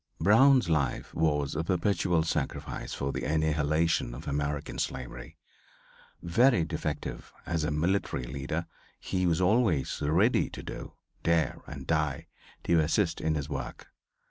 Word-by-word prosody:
Brown's 120 - +5
life 75 -6 0
was 75 -3 +1
a 80 - -1
perpetual 90 -1 +1
sacrifice 80 - -3
for 70 0 -2
the - - -4
annihilation 75 -2 +1
of 70 - -9
American 75 0 -2
slavery. 65 -2 -5 0.9
Very 115 +2 +4
defective 75 -2 -4
as 85 -2 -1
a 75 - 0
military 80 -2 0
leader 70 +6 -3 0.3
he 90 -1 -1
was 80 -2 +2
always 95 - +2
ready 85 +11 +3
to - - -8
do, - - -7 0.3
dare 85 -3 +1
and 70 -2 -8
die 75 -4 0 0.4
to 85 -1 +3
assist 85 +2 +1
in 80 - +1
this 75 -2 -2
work. 70 -4 -6
80 Hz, 135 wpm, -29 LUFS, 75-85 Hz, 0.9 s, Brown's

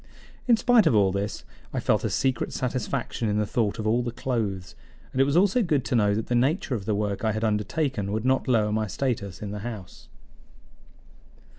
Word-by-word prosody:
In 235 -2 +5
spite 240 -2 +4
of - - +3
all 100 -2 +4
this, 100 +2 -3 0.3
I - - -2
felt - - +1
a - - 0
secret 130 -2 0
satisfaction 125 -2 -2
in 105 - 0
the 105 - +1
thought 105 -1 -1
of 110 - -4
the 120 +2 +1
clothes, 110 -7 -3 0.4
and 130 - +1
it - - +5
was 140 +4 +1
also 200 +6 +4
good 150 - +1
to - - -1
know 105 -3 +3
that 110 - -2
the - - -2
nature 135 +5 +1
of 105 -5 -3
the 105 - 0
work 100 0 -2
I 110 -1 +1
had 110 +1 -3
undertaken 105 - -1
would 110 +2 -2
not 130 +1 +1
lower 110 -4 +2
my 110 0 0
status 105 -4 -3
in 100 - -5
the 105 - -5
house. 105 -4 -8
115 Hz, 205 wpm, -26 LUFS, 105-130 Hz, 0.4 s, In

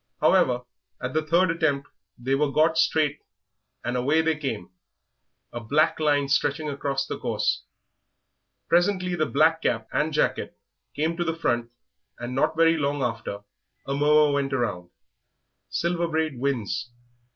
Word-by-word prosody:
However, 130 -10 +3 0.4
at 125 +1 -4
the 155 - +2
third 170 +3 +2
attempt 155 -5 0 0.3
they 130 +3 -2
were 140 +1 +1
got 160 +3 +3
straight 150 -2 +2 0.7
and 120 +1 -1
away 145 +6 +2
they 160 0 +1
came, 130 - -5 0.8
a 120 - -4
black 145 +10 +1
line 145 -2 +2
stretching 145 +3 +1
right 150 - -2
across 140 -1 -2
the - - -5
course. - - -1 1.0
Presently 180 +1 +2
the 155 -3 0
black 160 +4 +3
cap 115 -6 -1
and 155 +2 +1
jacket 150 - -1 0.4
came 160 +3 0
to 175 - 0
the 165 -1 -2
front, 120 -7 0 0.5
and 120 +1 -5
not 155 +4 +1
very 165 0 +4
long 145 -2 -1
after 115 -3 -3 0.4
a 140 - -2
murmur 150 +1 +4
went 140 -1 -1
round, 90 -9 -2 0.8
'Silver 170 0 0
Braid 160 -5 -1
wins.' 125 -3 -2
145 Hz, 150 wpm, -25 LUFS, 135-160 Hz, 1.0 s, very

